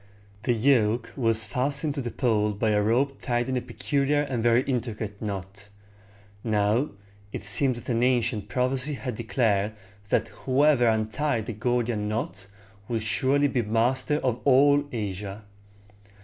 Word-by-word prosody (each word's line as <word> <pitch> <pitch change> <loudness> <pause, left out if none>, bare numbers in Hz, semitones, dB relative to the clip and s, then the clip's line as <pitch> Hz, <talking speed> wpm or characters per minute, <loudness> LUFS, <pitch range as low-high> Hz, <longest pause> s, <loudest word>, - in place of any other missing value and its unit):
The 120 - +3
yoke 115 -2 +2
was 115 -4 +2
fastened 140 +7 0
to 140 - -3
the 120 - -4
pole 110 -5 0
by 110 +2 0
a 105 0 +2
rope 125 +6 0
tied 120 -1 -1
in 130 - -1
a 125 - 0
peculiar 140 +4 0
and 130 -5 -3
very 120 +2 +3
intricate 110 -6 -4
knot. 100 -1 -6 0.7
Now, 110 +5 +1 0.4
it - - -6
seems 130 -4 +4
that - - -4
an 115 - 0
ancient 120 -4 +1
prophecy 130 +5 0
had 130 -1 -5
declared 110 -2 0 0.4
that - - +1
whoever 135 -1 +2
untied 110 +2 0
the 115 - -5
Gordian 120 -1 -1
knot 110 - -4 0.4
would 115 -2 -2
surely 140 +6 +1
be 130 -3 0
master 120 +6 +1
of 125 -2 -1
all 145 +1 +4
Asia. 105 -2 -5
120 Hz, 150 wpm, -26 LUFS, 110-130 Hz, 0.7 s, seems